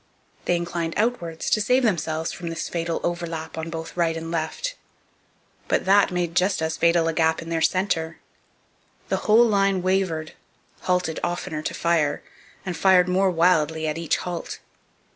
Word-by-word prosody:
They 175 Hz, -, +2 dB
inclined 170 Hz, -1 st, -3 dB
outwards 195 Hz, -8 st, -1 dB
to 215 Hz, -, +3 dB
save 250 Hz, +5 st, +3 dB
themselves 160 Hz, -6 st, 0 dB
from 170 Hz, -1 st, -6 dB
this 165 Hz, -1 st, -4 dB
fatal 165 Hz, -1 st, -2 dB
overlap 165 Hz, -2 st, -3 dB
on 160 Hz, 0 st, -4 dB
both 165 Hz, 0 st, -6 dB
right 165 Hz, -2 st, +1 dB
and 165 Hz, 0 st, -6 dB
left. 170 Hz, -, -3 dB, 0.9 s
But -, -, +1 dB
that 195 Hz, +1 st, +5 dB
made 175 Hz, -2 st, -2 dB
just 185 Hz, +2 st, +2 dB
as 160 Hz, 0 st, -1 dB
fatal 170 Hz, 0 st, +3 dB
a 165 Hz, -, 0 dB
gap 160 Hz, 0 st, +2 dB
in 165 Hz, -, -8 dB
their 165 Hz, -1 st, -1 dB
centre. 165 Hz, -3 st, 0 dB, 0.9 s
Their -, -, 0 dB
whole 225 Hz, +3 st, +5 dB
line 195 Hz, -4 st, +2 dB
wavered, 185 Hz, -4 st, 0 dB, 0.5 s
halted 180 Hz, -3 st, 0 dB
oftener 175 Hz, -2 st, -3 dB
to -, -, -4 dB
fire, 165 Hz, -4 st, +1 dB, 0.4 s
and 180 Hz, -2 st, -3 dB
fired 185 Hz, -1 st, +4 dB
more 190 Hz, +1 st, +2 dB
wildly 160 Hz, -2 st, +2 dB
at 155 Hz, +1 st, -2 dB
each 165 Hz, -, 0 dB
halt. 175 Hz, -2 st, -5 dB
170 Hz, 160 wpm, -24 LUFS, 160-185 Hz, 0.9 s, that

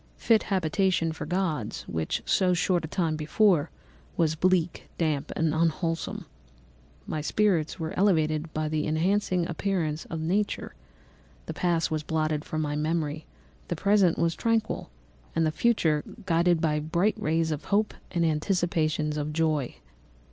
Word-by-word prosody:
Fit 225 Hz, -2 st, +3 dB
habitation 185 Hz, -2 st, +1 dB
for 160 Hz, -, -6 dB
gods, 160 Hz, -, -2 dB
which, 80 Hz, -1 st, -3 dB
so 180 Hz, -1 st, +3 dB
short 175 Hz, 0 st, +1 dB
a -, -, -3 dB
time 165 Hz, -1 st, 0 dB
before, 160 Hz, +1 st, +2 dB, 0.5 s
was 160 Hz, -2 st, +2 dB
bleak, 175 Hz, +1 st, 0 dB
damp, 155 Hz, -4 st, -1 dB
and 160 Hz, -1 st, +1 dB
unwholesome. 165 Hz, +1 st, -1 dB, 0.8 s
My 155 Hz, -, -3 dB
spirits 175 Hz, -1 st, +1 dB
were 160 Hz, -1 st, -3 dB
elevated 155 Hz, -5 st, +2 dB
by 155 Hz, -1 st, -2 dB
the 155 Hz, 0 st, -1 dB
enchanting 180 Hz, +2 st, +1 dB
appearance 165 Hz, -3 st, -2 dB
of 165 Hz, -, -5 dB
nature; 190 Hz, +6 st, -1 dB, 0.7 s
the -, -, -5 dB
past 170 Hz, -3 st, 0 dB
was 155 Hz, -1 st, 0 dB
blotted 155 Hz, -1 st, -1 dB
from 155 Hz, 0 st, -3 dB
my 145 Hz, -1 st, -2 dB
memory, 155 Hz, 0 st, -2 dB, 0.4 s
the -, -, -2 dB
present 200 Hz, -4 st, +3 dB
was 170 Hz, 0 st, +1 dB
tranquil, 225 Hz, -, -1 dB, 0.5 s
and 165 Hz, -, +2 dB
the 155 Hz, -, +1 dB
future 160 Hz, -7 st, +2 dB, 0.2 s
gilded 170 Hz, -1 st, +3 dB
by 150 Hz, -2 st, +1 dB
bright 170 Hz, +7 st, +1 dB
rays 160 Hz, +1 st, +1 dB
of 150 Hz, 0 st, -4 dB
hope 210 Hz, +2 st, +1 dB, 0.2 s
and 170 Hz, -2 st, 0 dB
anticipations 155 Hz, -2 st, 0 dB
of 150 Hz, 0 st, -2 dB
joy." 155 Hz, -4 st, 0 dB
165 Hz, 145 wpm, -27 LUFS, 155-180 Hz, 0.8 s, Fit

